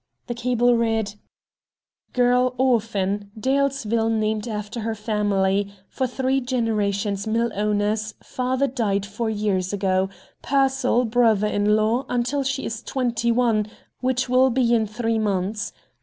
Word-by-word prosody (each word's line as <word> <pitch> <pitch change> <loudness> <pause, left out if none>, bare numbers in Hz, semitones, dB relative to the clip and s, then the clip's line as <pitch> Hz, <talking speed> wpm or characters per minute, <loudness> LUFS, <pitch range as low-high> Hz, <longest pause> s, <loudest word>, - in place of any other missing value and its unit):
The 240 - -3
cable 245 0 +2
read: 225 -3 0 1.0
"Girl 250 0 +3
orphan, 210 -5 0
Dalesville 260 -3 +1
named 215 0 0
after 210 +1 -4
her 225 0 -2
family, 205 -2 0 0.2
for 260 - -1
three 265 +2 0
generations 210 -5 -1
mill 230 +2 +1
owners, 210 +1 0
father 255 +2 -1
died 215 -7 -1
four 220 +3 -3
years 205 -4 -1
ago, 190 -1 +1 0.3
Pearsall 265 -2 +2
brother 225 -3 +3
in 210 0 +2
law 225 +5 +1
until 250 +3 0
she 270 0 -2
is 225 0 -4
twenty 235 -3 -1
one, 230 -3 +2 0.3
which 255 0 0
will 255 +1 +4
be 240 -1 +2
in 220 -2 +2
three 225 +1 -1
months. 205 0 -1
225 Hz, 130 wpm, -23 LUFS, 210-250 Hz, 1.0 s, will